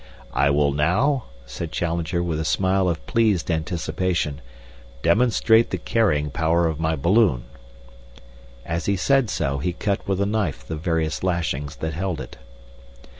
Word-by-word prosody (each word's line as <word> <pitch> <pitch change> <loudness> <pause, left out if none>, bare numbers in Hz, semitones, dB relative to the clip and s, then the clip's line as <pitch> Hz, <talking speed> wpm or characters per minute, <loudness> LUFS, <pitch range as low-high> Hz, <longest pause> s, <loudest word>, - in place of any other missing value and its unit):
"I 70 - +3
will 70 0 +3
now," 105 - +1 0.2
said 80 +5 -6
Challenger, 85 +1 -1
with 80 -3 -2
a - - -1
smile 95 +3 +1
of 85 -2 -3
pleased 105 -7 +1
anticipation, 80 -1 -1 0.6
"demonstrate 110 +4 +4
the - - -2
carrying 75 -11 +1
power 85 +3 +2
of 80 -2 -3
my 80 0 0
balloon." 85 - +3 1.2
As 85 +1 -3
he 100 - +2
said 135 +5 +2
so 70 0 -1
he 90 +5 -1
cut 100 +2 -2
with 95 -1 0
a 100 - +2
knife 100 - -2
the 80 - -4
various 80 -2 -1
lashings 80 -5 -1
that 80 0 -4
held 90 0 -2
it. - - -8
85 Hz, 150 wpm, -23 LUFS, 80-100 Hz, 1.2 s, demonstrate